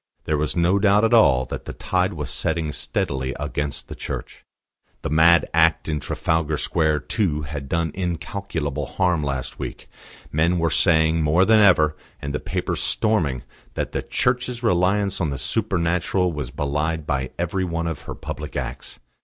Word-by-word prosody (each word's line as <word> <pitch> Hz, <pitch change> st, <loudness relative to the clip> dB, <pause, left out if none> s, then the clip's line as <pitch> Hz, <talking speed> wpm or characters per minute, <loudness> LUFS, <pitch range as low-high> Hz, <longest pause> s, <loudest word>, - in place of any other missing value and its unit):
There 75 Hz, -, +1 dB
was 75 Hz, 0 st, -1 dB
no 90 Hz, +3 st, +3 dB
doubt 105 Hz, +1 st, +4 dB
at 115 Hz, -, +1 dB
all 70 Hz, -, +5 dB
that -, -, -6 dB
the -, -, -6 dB
tide 95 Hz, +1 st, 0 dB
was 75 Hz, -5 st, -5 dB
setting 80 Hz, +2 st, -1 dB
steadily 65 Hz, -2 st, -2 dB
against 75 Hz, -1 st, -3 dB
the -, -, -7 dB
Church. -, -, -6 dB, 0.6 s
The -, -, -3 dB
mad 85 Hz, +2 st, +5 dB
act 80 Hz, 0 st, +3 dB
in 75 Hz, -2 st, -1 dB
Trafalgar 80 Hz, -1 st, -1 dB
Square, 75 Hz, -1 st, +1 dB
too, 80 Hz, -, -1 dB
had 70 Hz, -2 st, -6 dB
done 85 Hz, -2 st, 0 dB
incalculable 85 Hz, -5 st, -3 dB
harm 90 Hz, -2 st, +1 dB
last 70 Hz, -2 st, -3 dB
week: -, -, -6 dB, 0.4 s
men 85 Hz, +4 st, +2 dB
were 85 Hz, -1 st, +1 dB
saying 80 Hz, -2 st, +3 dB
more 80 Hz, +5 st, +4 dB
than 110 Hz, +1 st, +5 dB
ever, 85 Hz, -7 st, +5 dB, 0.2 s
and 70 Hz, -1 st, -5 dB
the 75 Hz, -, -1 dB
papers -, -, -2 dB
storming, 80 Hz, -, +1 dB, 0.3 s
that -, -, -2 dB
the -, -, -2 dB
Church's 125 Hz, -1 st, -1 dB
reliance 100 Hz, -1 st, +2 dB
on 80 Hz, -, +1 dB
the 70 Hz, -, -3 dB
supernatural 90 Hz, -, 0 dB
was 70 Hz, -5 st, -4 dB
belied 75 Hz, +3 st, -2 dB
by 65 Hz, -4 st, -1 dB
every 90 Hz, +2 st, -1 dB
one 85 Hz, -2 st, -2 dB
of 80 Hz, -2 st, -3 dB
her -, -, -4 dB
public -, -, -7 dB
acts. -, -, -5 dB
80 Hz, 170 wpm, -23 LUFS, 75-90 Hz, 0.6 s, all